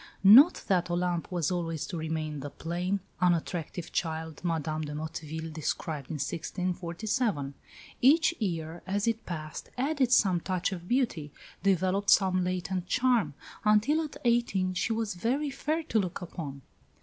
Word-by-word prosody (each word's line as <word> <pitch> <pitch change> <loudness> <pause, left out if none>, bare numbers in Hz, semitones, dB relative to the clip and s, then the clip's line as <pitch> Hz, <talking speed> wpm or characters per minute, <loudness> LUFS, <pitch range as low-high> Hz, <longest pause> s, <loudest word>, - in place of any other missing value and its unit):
Not 250 - +8
that 180 -2 +1
Olympe 175 -1 0
was 175 -2 0
always 165 -3 -2
to 180 - -6
remain 155 -2 -3
the 145 +1 -5
plain, 180 +6 -2 0.2
unattractive 175 -1 -1
child 160 -2 -3
Madame 155 -2 -1
de 150 -1 -5
Motteville 160 +1 -5
describes 155 -2 -3
in 160 - -3
1647. 175 - -2 0.5
Each 310 +6 +5
year, 170 -5 -3
as 200 +2 0
it 230 0 -1
passed, 155 -3 -6
added 270 -1 +1
some 190 -7 +4
touch 185 +1 -1
of 175 -2 -6
beauty, 225 - 0 0.3
developed 195 +1 +1
some 185 -2 +4
latent 180 0 -2
charm, 240 - +2 0.3
until 215 +9 +4
at 300 - -7
eighteen 235 -6 +2
she 185 +5 -1
was 225 -2 -1
very 260 +11 -1
fair 310 +4 -1
to 230 -8 +1
look 185 -4 -2
upon. 150 -6 -7
180 Hz, 145 wpm, -29 LUFS, 160-215 Hz, 0.5 s, Not